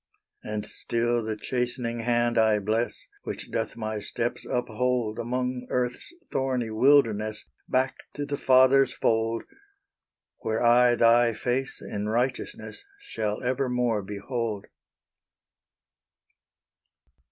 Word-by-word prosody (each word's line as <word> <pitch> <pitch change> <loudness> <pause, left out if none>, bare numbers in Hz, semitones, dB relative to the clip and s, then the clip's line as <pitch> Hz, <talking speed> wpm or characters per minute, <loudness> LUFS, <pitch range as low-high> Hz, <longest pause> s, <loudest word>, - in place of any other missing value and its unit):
And 105 -1 -4
still 120 +1 -1
the 110 0 -2
chastening 120 0 -2
hand 120 0 +1
I 110 -2 +4
bless, 110 +3 -1 0.2
Which - - -6
doth - - -2
my 110 -1 -3
steps 115 +3 -3
uphold 125 -1 -1
Along 125 +1 -2
earth's 125 - -2 0.2
thorny 130 -4 -1
wilderness, 110 -4 +3 0.2
Back 130 +1 +1 0.2
to 145 - -3
the 145 0 -2
Father's 130 0 +5
fold, 115 0 +1 1.0
Where 110 +1 -1
I 120 +1 +5
Thy 115 0 +4
face 130 +2 -2
in 105 +1 -4
righteousness 125 - -2 0.2
Shall 110 - -3
evermore 125 -3 0
behold. 105 +1 -4
120 Hz, 105 wpm, -27 LUFS, 110-125 Hz, 1.0 s, Father's